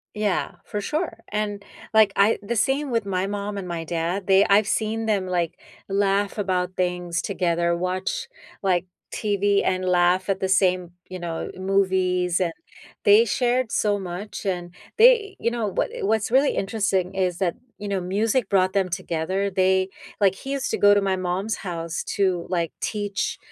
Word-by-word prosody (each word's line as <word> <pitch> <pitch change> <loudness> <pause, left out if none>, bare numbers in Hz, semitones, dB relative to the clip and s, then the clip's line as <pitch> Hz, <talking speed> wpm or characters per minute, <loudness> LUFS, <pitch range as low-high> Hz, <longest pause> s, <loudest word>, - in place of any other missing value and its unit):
Yeah, 210 -3 -1
for 210 -2 -4
sure, 300 - -3
and, 205 -1 -2 0.3
like, 220 -2 +6
I 205 +3 +3
The 205 +4 -3
same 270 +6 +1
with 230 -4 0
my 190 -1 -1
mom 205 0 -4
and 190 -2 -5
my 170 -2 -4
dad, 170 +4 -2
they 195 +1 +5
I've 200 +1 +4
seen 220 +1 -1
them, 200 -4 0
like, 175 -3 -1 0.3
laugh 200 +1 +1
about 185 -2 -1
things 180 -1 -1
together, 170 -3 0
watch, 185 - -2 0.4
like, 185 -2 +2 0.3
TV 205 -1 +1
and 185 0 0
laugh 180 +1 +3
at 195 -1 +1
the 190 - -1
same, 185 -2 +2 0.2
you 185 - -6
know, 170 -2 -4
movies, 185 -2 +1
and 175 -3 0 0.5
they 210 +2 +7
shared 245 +1 0
so 205 -1 +1
much, 190 +3 -6
and 175 -2 -3 0.2
they 455 -3 +5
You 235 - 0
know, 235 -3 -1
what 195 - -1
i - - -6
what's 220 +2 +1
really 270 +3 +3
interesting 195 -3 0
is 185 -2 0
that, 180 -2 0 0.2
you 205 - -6
know, 195 -2 -1
music 210 +5 0
brought 185 -2 +2
them 195 -2 +1
together, 185 +2 -2
they 190 0 +2 0.3
Like, 195 -3 +4
he 270 +8 -6
used 275 -1 -2
to - - 0
go 205 0 +6
to 205 - +3
my 190 -1 0
mom's 185 +4 -2
house 165 -3 -4
to, 185 -4 +1
like, 170 -3 -1
teach, 205 -2 -2
195 Hz, 175 wpm, -24 LUFS, 180-210 Hz, 0.5 s, they